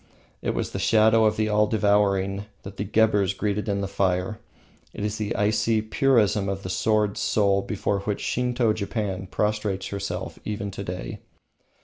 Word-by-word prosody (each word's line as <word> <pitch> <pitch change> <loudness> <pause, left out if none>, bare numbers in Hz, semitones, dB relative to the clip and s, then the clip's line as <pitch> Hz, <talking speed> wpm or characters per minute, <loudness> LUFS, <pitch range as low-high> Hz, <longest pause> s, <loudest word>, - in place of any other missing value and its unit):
It - - -1
was - - -2
the - - -4
shadow 110 0 +4
of 105 - +2
the 110 0 +1
All 105 0 +3
devouring 100 -2 +1 0.2
that 100 - -9
the - - -1
Gheburs 105 -2 +2
greeted 105 0 -1
in 100 0 0
the 100 - -2
fire. 95 +2 -1 0.6
It 105 - -3
is 105 0 -3
the 105 -1 -2
icy 110 +1 +1
purism 110 -5 +2
of 100 0 -4
the 90 - -4
sword 105 0 +1
soul 100 -2 +2
before 100 -1 -1
which 100 +1 -3
Shinto 125 -2 +1
Japan 100 -3 -3
prostrates 105 -1 -1
herself 100 0 -5
even 105 -1 -4
to 100 +1 -6
day. 90 -11 -6
105 Hz, 165 wpm, -25 LUFS, 100-110 Hz, 0.6 s, shadow